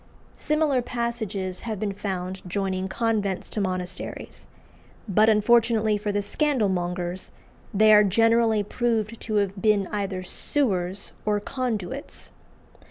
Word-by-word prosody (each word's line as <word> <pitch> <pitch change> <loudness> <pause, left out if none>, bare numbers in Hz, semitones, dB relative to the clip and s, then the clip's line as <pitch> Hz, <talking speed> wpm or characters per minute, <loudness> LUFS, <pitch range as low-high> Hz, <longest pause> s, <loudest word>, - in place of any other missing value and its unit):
Similar 300 -4 +1
passages 220 -6 -3
have 220 -4 -4
been 205 -1 -2
found 190 -2 -4
joining 190 0 -1
convents 205 -2 -1
to 210 - -2
monasteries; 185 -1 -4 0.6
but, 215 +2 +4
unfortunately 220 0 +4
for 210 0 -2
the 205 0 -1
scandalmongers, 185 - -1 0.4
they 215 +1 +6
are 210 0 +8
generally 225 +1 +3
proved 225 0 -1
to 215 - -3
have 200 -1 0
been 210 -3 +3
either 195 -3 -2
sewers 190 -4 -1
or 210 -1 +1
conduits. 250 +2 -4
210 Hz, 115 wpm, -25 LUFS, 190-230 Hz, 0.6 s, are